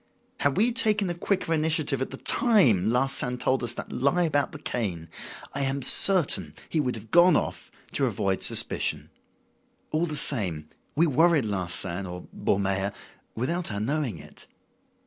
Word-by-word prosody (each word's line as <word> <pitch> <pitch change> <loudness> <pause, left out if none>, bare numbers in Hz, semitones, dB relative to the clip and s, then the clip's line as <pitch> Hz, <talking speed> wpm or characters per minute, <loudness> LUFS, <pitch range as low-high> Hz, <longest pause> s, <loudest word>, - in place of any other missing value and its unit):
Had 140 +2 0
we 230 +5 +2
taken 215 -5 +3
a - - -3
quicker 175 -1 -2
initiative 155 -3 -1
at 130 - -3
the 135 - -9
time 135 - +2
Larsan 125 +1 +1
told 130 +1 -1
us 120 -1 -2
that - - -9
lie 140 +8 0
about 145 -4 -1
the - - -9
cane, 95 - -5 0.4
I 140 - -3
am 135 0 -2
certain 185 0 +5
he 160 - -1
would 125 -5 -2
have 110 0 -12
gone 175 +1 +5
off, - - -4 0.2
to 135 - 0
avoid 100 -4 -2
suspicion. - - +2 0.8
All 160 +3 -1
the 155 - -5
same, 95 - 0 0.3
we 165 +3 +3
worried 160 -1 +2
Larsan 95 -1 -3
or 90 0 -9
Ballmeyer 95 0 -1 0.4
without 165 +6 -3
our 100 - -4
knowing 130 - -3
it." - - -15
135 Hz, 160 wpm, -25 LUFS, 105-160 Hz, 0.8 s, certain